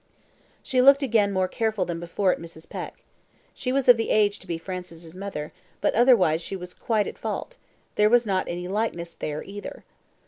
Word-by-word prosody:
She 255 Hz, -1 st, +2 dB
looked 275 Hz, +2 st, +7 dB
again 220 Hz, -6 st, +2 dB
more 185 Hz, -1 st, +1 dB
careful 220 Hz, -2 st, -1 dB
than 170 Hz, -1 st, -4 dB
before 175 Hz, +3 st, 0 dB
at -, -, -6 dB
Mrs. 165 Hz, -1 st, -11 dB
Peck. -, -, -7 dB, 0.5 s
She 255 Hz, -, -3 dB
was 270 Hz, 0 st, 0 dB
of 245 Hz, -2 st, +8 dB
the 225 Hz, -, -2 dB
age 205 Hz, -1 st, +3 dB
to 190 Hz, -, -16 dB
be 170 Hz, -1 st, -2 dB
Francis's 170 Hz, -2 st, -8 dB
mother, 185 Hz, -6 st, -6 dB, 0.3 s
but -, -, +1 dB
otherwise 215 Hz, -10 st, +4 dB
she 195 Hz, -, -5 dB
was 180 Hz, -1 st, -8 dB
quite 215 Hz, -3 st, 0 dB
at -, -, -7 dB
fault; -, -, -4 dB, 0.4 s
there 210 Hz, 0 st, +4 dB
was 240 Hz, +1 st, +4 dB
not 190 Hz, -3 st, 0 dB
any 175 Hz, +1 st, -4 dB
likeness 185 Hz, -4 st, -2 dB
there 150 Hz, 0 st, -4 dB
either. 205 Hz, +1 st, -8 dB
195 Hz, 195 wpm, -25 LUFS, 175-225 Hz, 0.5 s, of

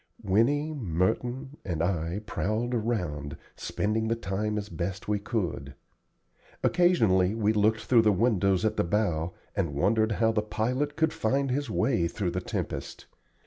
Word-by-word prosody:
Winnie, 140 Hz, +11 st, +2 dB
Merton, 120 Hz, -, -1 dB
and 85 Hz, -3 st, -2 dB
I 85 Hz, +1 st, -1 dB
prowled 110 Hz, +4 st, -1 dB
around, 90 Hz, -, -2 dB, 0.2 s
spending 110 Hz, +2 st, -1 dB
the 115 Hz, -, +1 dB
time 105 Hz, 0 st, -2 dB
as 105 Hz, -1 st, -3 dB
best 90 Hz, +2 st, -4 dB
we 105 Hz, -1 st, +1 dB
could. 90 Hz, -, -3 dB, 0.9 s
Occasionally 110 Hz, -, +3 dB
we 110 Hz, -1 st, +2 dB
looked 110 Hz, +1 st, +2 dB
through 120 Hz, -3 st, +4 dB
the 110 Hz, -1 st, +4 dB
windows 100 Hz, -2 st, +2 dB
at 110 Hz, 0 st, 0 dB
the -, -, +3 dB
bow, 85 Hz, -3 st, 0 dB, 0.2 s
and 85 Hz, -8 st, -1 dB
wondered 110 Hz, +8 st, +2 dB
how 115 Hz, +1 st, +2 dB
the 110 Hz, -1 st, +1 dB
pilot 125 Hz, +7 st, -1 dB
could 160 Hz, 0 st, +1 dB
find 135 Hz, +4 st, 0 dB
his 140 Hz, 0 st, -1 dB
way 110 Hz, -6 st, +1 dB
through 90 Hz, 0 st, -2 dB
the 90 Hz, +1 st, -2 dB
tempest. -, -, -5 dB
105 Hz, 150 wpm, -28 LUFS, 90-115 Hz, 0.9 s, through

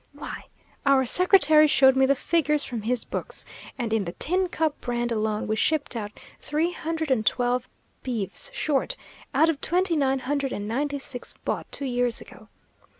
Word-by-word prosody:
Why, -, -, -8 dB, 0.4 s
our 275 Hz, -2 st, +4 dB
secretary 310 Hz, 0 st, +6 dB
showed 265 Hz, -2 st, +5 dB
me 265 Hz, 0 st, +4 dB
the 275 Hz, -, +3 dB
figures 300 Hz, 0 st, +1 dB
from 235 Hz, -4 st, -5 dB
his 235 Hz, +2 st, -1 dB
books; -, -, -5 dB, 0.3 s
and 230 Hz, -3 st, -2 dB
in 215 Hz, -3 st, +1 dB
the 170 Hz, -, -5 dB
'Tin 365 Hz, -, 0 dB
Cup' 315 Hz, -3 st, -1 dB
brand 240 Hz, -1 st, -2 dB
alone 215 Hz, -1 st, -1 dB
we 215 Hz, -, 0 dB
shipped 300 Hz, +2 st, 0 dB
out 210 Hz, -2 st, -4 dB, 0.3 s
three 315 Hz, +4 st, -1 dB
hundred 320 Hz, -3 st, -3 dB
and 235 Hz, -5 st, +2 dB
twelve 245 Hz, +2 st, 0 dB, 0.3 s
beeves 235 Hz, -, -3 dB
short, 310 Hz, -, -1 dB, 0.4 s
out 310 Hz, +4 st, +5 dB
of 320 Hz, -4 st, -1 dB
twenty 360 Hz, 0 st, +1 dB
nine 270 Hz, -3 st, +2 dB
hundred 275 Hz, +1 st, -2 dB
and 205 Hz, 0 st, -4 dB
ninety 285 Hz, +5 st, -1 dB
six 270 Hz, -2 st, -7 dB
bought -, -, -3 dB
two 280 Hz, -, -5 dB
years 245 Hz, -2 st, 0 dB
ago. -, -, -14 dB
270 Hz, 175 wpm, -25 LUFS, 240-310 Hz, 0.4 s, secretary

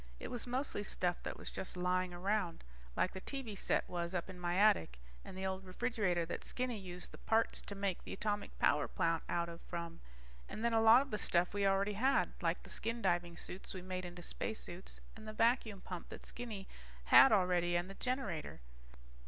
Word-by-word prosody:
It -, -, -6 dB
was 245 Hz, 0 st, -2 dB
mostly 255 Hz, -3 st, 0 dB
stuff 180 Hz, -3 st, -1 dB
that -, -, -5 dB
was -, -, -5 dB
just 185 Hz, -, -1 dB
lying 180 Hz, 0 st, +1 dB
around. 180 Hz, -1 st, -1 dB, 0.3 s
Like 185 Hz, -, +2 dB
the 190 Hz, -, -7 dB
TV 265 Hz, -5 st, -5 dB
set -, -, +1 dB
was 175 Hz, 0 st, -3 dB
up 180 Hz, +1 st, -2 dB
in 180 Hz, -, -10 dB
my 175 Hz, 0 st, -1 dB
attic, 80 Hz, -, +4 dB, 0.3 s
and 185 Hz, -, -9 dB
the 190 Hz, -, -2 dB
old 190 Hz, 0 st, -2 dB
refrigerator 185 Hz, -3 st, 0 dB
that 170 Hz, -, -4 dB
Skinny 250 Hz, -3 st, -2 dB
used 180 Hz, -2 st, -7 dB
the -, -, -11 dB
parts 225 Hz, 0 st, +1 dB
to 200 Hz, -, -7 dB
make 195 Hz, -2 st, -1 dB
the -, -, -8 dB
atomic 205 Hz, +1 st, -2 dB
power 145 Hz, 0 st, +3 dB
plant 165 Hz, -1 st, +1 dB
out 170 Hz, 0 st, +1 dB
of 170 Hz, 0 st, -8 dB
from. 170 Hz, -1 st, -5 dB, 0.5 s
And 220 Hz, -, -4 dB
then, 235 Hz, -, +2 dB
a 225 Hz, -, +4 dB
lot 225 Hz, +4 st, +8 dB
of 280 Hz, -, -13 dB
the 210 Hz, -, -1 dB
stuff 175 Hz, 0 st, +2 dB
we 200 Hz, -1 st, +2 dB
already 195 Hz, +1 st, +2 dB
had. 260 Hz, +7 st, +2 dB
Like -, -, 0 dB
the -, -, -11 dB
skin 230 Hz, +1 st, -3 dB
diving 175 Hz, -2 st, +1 dB
suits 190 Hz, +3 st, -7 dB
we 185 Hz, -, -6 dB
made 185 Hz, 0 st, -3 dB
into 175 Hz, 0 st, -7 dB
spacesuits 190 Hz, -2 st, -3 dB
and 220 Hz, 0 st, -11 dB
the 215 Hz, -, -5 dB
vacuum 225 Hz, -3 st, +2 dB
pump 180 Hz, -2 st, -7 dB
that -, -, -9 dB
Skinny 220 Hz, -5 st, -6 dB, 0.4 s
had 270 Hz, -, +9 dB
already 180 Hz, -3 st, +3 dB
and 175 Hz, +1 st, +1 dB
the 195 Hz, -, -8 dB
generator. 220 Hz, -, -2 dB
190 Hz, 205 wpm, -36 LUFS, 175-220 Hz, 0.5 s, had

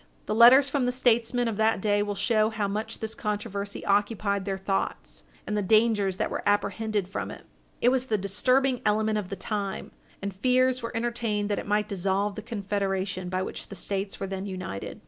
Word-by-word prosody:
The -, -, -1 dB
letters 245 Hz, +5 st, +8 dB
from 275 Hz, -2 st, 0 dB
the -, -, +2 dB
statesmen 245 Hz, -1 st, +2 dB
of 220 Hz, -3 st, -2 dB
that 220 Hz, -1 st, +2 dB
day 205 Hz, 0 st, +2 dB
will 205 Hz, 0 st, -2 dB
show 215 Hz, +1 st, +2 dB
how 215 Hz, -2 st, -2 dB
much 210 Hz, +2 st, -4 dB
this 220 Hz, 0 st, -3 dB
controversy 205 Hz, -2 st, -4 dB
occupied 200 Hz, -1 st, +1 dB
their 195 Hz, -1 st, -2 dB
thoughts, 195 Hz, 0 st, -3 dB, 0.2 s
and 210 Hz, -, -2 dB
the 210 Hz, -, +1 dB
dangers 205 Hz, -2 st, +3 dB
that -, -, -1 dB
were -, -, -2 dB
apprehended 205 Hz, 0 st, 0 dB
from 195 Hz, -, -4 dB
it. -, -, -10 dB, 0.4 s
It 245 Hz, -, +5 dB
was 260 Hz, 0 st, +1 dB
the 215 Hz, -, +1 dB
disturbing 255 Hz, +7 st, +1 dB
element 215 Hz, 0 st, +2 dB
of 190 Hz, -3 st, -6 dB
the 195 Hz, -, -4 dB
time, 200 Hz, -2 st, -4 dB, 0.3 s
and 200 Hz, 0 st, -4 dB
fears 255 Hz, +5 st, +2 dB
were 230 Hz, 0 st, -4 dB
entertained 230 Hz, -3 st, -1 dB
that 205 Hz, -, 0 dB
it -, -, -7 dB
might 210 Hz, 0 st, +1 dB
dissolve 195 Hz, +1 st, 0 dB
the 215 Hz, -, -6 dB
Confederation 195 Hz, -4 st, -2 dB
by 185 Hz, +1 st, -1 dB
which -, -, -6 dB
the -, -, -9 dB
States 195 Hz, 0 st, -3 dB
were -, -, -2 dB
then 195 Hz, +1 st, -4 dB
united. 185 Hz, -, -6 dB
210 Hz, 200 wpm, -27 LUFS, 195-230 Hz, 0.4 s, letters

